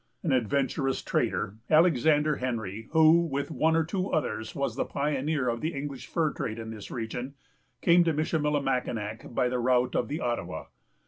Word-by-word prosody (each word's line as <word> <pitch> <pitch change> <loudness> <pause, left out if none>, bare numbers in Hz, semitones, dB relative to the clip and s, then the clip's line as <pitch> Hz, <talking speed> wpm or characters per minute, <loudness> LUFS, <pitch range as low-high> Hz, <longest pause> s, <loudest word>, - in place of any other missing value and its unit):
An 165 - 0
adventurous 135 +2 0
trader, 100 +2 -1
Alexander 155 -2 +4
Henry, 110 -4 -4
who, 160 +1 +6
with 140 -1 -3
one 160 +1 +2
or 165 - +3
two 185 +4 -2
others, 135 -7 -2
was 140 - -1
the - - 0
pioneer 140 -1 -1
of 115 -1 -1
the 160 0 -2
English 140 -1 -5
fur 160 -3 0
trade 110 0 -4
in 110 -1 -6
this 105 -3 -8
region, 120 +4 -5 0.5
came 175 0 +5
to 165 - +3
Michillimackinac 140 -8 -1
by 125 - +2
the 125 0 -1
route 125 0 +2
of 120 - +1
the 150 +6 -3
Ottawa. 120 -1 -3
140 Hz, 170 wpm, -28 LUFS, 120-155 Hz, 0.5 s, who